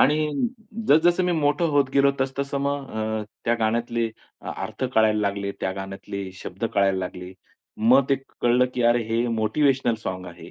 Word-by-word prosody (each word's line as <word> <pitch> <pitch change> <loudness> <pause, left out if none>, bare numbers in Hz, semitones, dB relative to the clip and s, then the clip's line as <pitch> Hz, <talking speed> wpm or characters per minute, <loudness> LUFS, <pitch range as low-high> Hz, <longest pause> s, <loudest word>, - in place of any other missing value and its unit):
आणि 150 +2 +5 0.7
जसं-जसं 175 +4 +5
मी 180 - +1
मोठं 150 +1 +2
होत 140 -2 +3
गेलो, 140 0 +5
तसं-तसं 140 +1 -1
मग 140 -1 -2
अ, 110 0 -2 0.2
त्या 120 - +3
गाण्यातले 115 +1 0 0.3
अ - - -6
अर्थ 130 - -5
कळायला 110 -1 +4
लागले, 100 -1 -1
त्या 95 - -1
गाण्यातले 95 0 -6
शब्द 95 +5 -5
कळायला 95 -1 +3
लागले. 90 0 -6 0.4
मग 125 +5 +5
ते 140 - +4 0.3
कळलं, 120 +1 +4
की 125 - 0
अरे 120 0 +2
हे 115 +2 +1
मोटिव्हेशनल 120 +3 +2
सॉन्ग 95 0 -4
आहे. 90 0 -11
115 Hz, 165 wpm, -24 LUFS, 100-140 Hz, 0.7 s, आणि